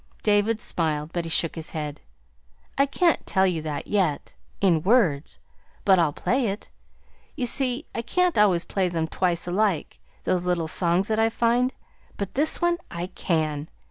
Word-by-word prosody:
David 210 +1 +2
smiled, 155 -5 -2
but 175 -1 -2
he - - -5
shook 165 0 0
his 160 -1 -6
head. 150 -2 -5 0.7
"I 275 +1 +3
can't 335 +4 +2
tell 190 0 +3
you 175 -4 0
that 150 -2 -4
yet 185 -8 0 0.3
in 175 -5 +3
words; 180 - +2 0.5
but 190 -2 +6
I'll 165 -3 +3
play 250 - 0
it. 200 +1 -5 0.6
You 255 - -1
see, 255 +3 0
I 230 - -2
can't 360 +9 +1
always 195 -5 +3
play 190 -2 0
them 165 -2 -1
twice 175 0 0
alike, 185 -2 0 0.2
those 180 -1 0
little 170 -2 0
songs 175 +4 +2
that 220 0 +1
I 225 0 +4
find, 235 +2 +2 0.5
but 200 -1 -4
this 300 +4 +1
one 345 0 +1
I 175 +2 -5
can. 155 -3 -1
185 Hz, 170 wpm, -25 LUFS, 165-230 Hz, 0.7 s, but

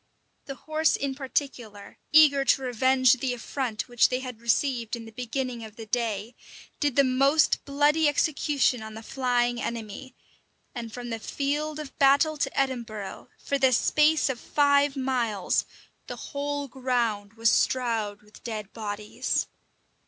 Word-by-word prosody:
The 275 - -6
horse 310 +2 +1
in 275 -1 -2
particular, 255 -6 -4
eager 295 -3 +6
to 270 0 +2
revenge 255 +1 +3
the 250 -1 -1
affront 240 -2 -4
which 240 -2 +3
they 255 - -1
had 250 -3 -8
received 235 0 0
in 230 -1 -9
the 225 - -11
beginning 245 +1 -4
of 220 -1 -10
the 225 - -9
day, 225 -1 -2 0.5
did 290 -4 0
the 280 - +5
most 275 +4 +3
bloody 295 +2 +3
execution 285 -4 +1
on 220 0 -8
the 220 - -9
flying 245 -1 0
enemy; 235 +3 -6 0.6
and 235 -3 -6
from 240 +1 -7
the 225 - -3
field 295 +5 -2
of 300 -3 -8
battle 285 +3 +4
to 280 - -1
Edinburgh, 235 -7 -3
for 280 - -2
the 265 -1 +4
space 300 +5 +3
of 265 -3 -2
five 285 0 +2
miles, 245 -7 0 0.4
the - - -5
whole 285 0 -4
ground 235 -5 -1
was 225 0 +2
strowed 225 -5 0
with 210 0 -18
dead 215 -4 -6
bodies. 210 -1 -2
255 Hz, 150 wpm, -26 LUFS, 225-280 Hz, 0.6 s, eager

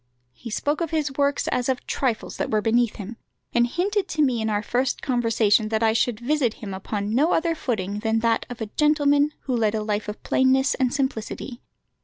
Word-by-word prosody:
He 235 - -9
spoke 290 +8 -1
of 335 - -1
his 300 -3 -1
works 280 0 +1
as 250 +1 0
of 255 -1 -1
trifles 245 -5 -2
that - - -2
were 215 - +2
beneath 230 +1 +2
him, 215 +3 -8 0.4
and 240 0 +3
hinted 380 - -1
to 310 -3 +1
me 250 -5 +1
in 220 - -1
our 210 0 0
first 250 +4 -1
conversation 225 -4 +2
that 220 +1 0
I 220 -1 +4
should 225 0 0
visit 250 -2 0
him 200 -3 -7
upon 200 +2 -3
no 295 +8 +3
other 330 0 +1
footing 210 - -3
than 225 +1 0
that 230 -1 +1
of 245 -2 -8
a - - -1
gentleman 295 -1 +3
who 260 - -2
led 220 -2 +1
a 215 - -1
life 210 0 -2
of 210 - -7
plainness 265 +1 +3
and 255 -2 0
simplicity. 260 -2 -3
240 Hz, 210 wpm, -24 LUFS, 220-280 Hz, 0.4 s, I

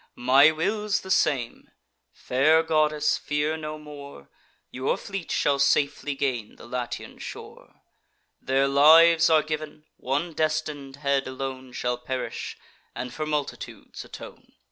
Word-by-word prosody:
My 135 +4 +6
will's 205 +6 -1
the 190 - -7
same: 135 -9 0 0.4
fair 155 +6 +2
goddess, 155 -1 +1
fear 150 +1 -1
no 155 -1 -6
more, 145 - -12 0.4
Your 130 +1 -1
fleet 195 -3 -6
shall 140 -1 +1
safely 140 +1 +1
gain 125 -6 -2
the - - -14
Latian 120 0 -5
shore; - - -11 0.6
Their 135 +1 +1
lives 160 +4 +6
are 155 -1 +4
giv'n; 155 0 -5
one 145 +6 -2
destin'd 155 -3 -2
head 140 -1 0
alone 130 -1 -6
Shall 125 0 -2
perish, 130 +1 -5 0.4
and 125 -1 -5
for 155 0 -4
multitudes 150 -2 -5
atone." - - -12
145 Hz, 125 wpm, -25 LUFS, 135-155 Hz, 0.6 s, My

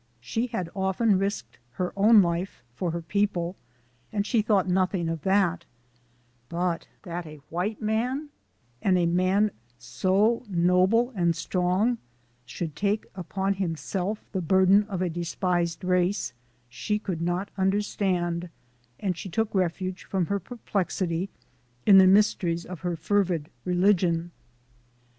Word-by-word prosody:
She 225 - -2
had 185 -7 -3
often 190 +1 +2
risked 195 - -3
her 180 +6 -3
own 210 +1 +6
life 170 -3 -3
for 175 +8 -2
her 170 0 -3
people, 180 -1 0 0.6
and 205 -1 -1
she 225 0 +2
thought 205 -3 +2
nothing 185 -1 +1
of 165 -2 -3
that; 190 -2 +2 0.9
but 170 0 -1 0.2
that 175 -3 -5
a 155 0 -10
white 200 +6 -2
man, 250 +7 -1 0.5
and 185 -2 +3
a 175 - +2
man 185 +5 +2 0.3
so 195 - +1
no 180 0 +3
ble 235 +4 +2
and 170 -7 +1
strong, 185 +7 0 0.5
should 165 +6 -4
so 150 - -16
take 205 +1 +1
upon 190 +2 -2
himself 190 +3 -3
the 190 - -2
burden 190 +4 +4
of 190 -3 -3
a - - +1
despised 175 +1 -1
race, 180 - +1 0.3
she 125 - -2
could 185 -6 -4
not 175 +3 -1
understand, 190 -3 0 0.5
and 190 -3 -1
she 190 +3 -7
took 220 +4 -1
refuge 185 0 -1
from 190 -3 0
her 200 +4 -1
perplexity 190 -4 -2 0.6
in 195 -2 +8
the 190 - +7
mysteries 185 -4 +3
of 180 -3 -7
her 175 0 -2
fervid 170 -2 0
religion. 180 -2 +2
185 Hz, 140 wpm, -26 LUFS, 170-200 Hz, 0.9 s, in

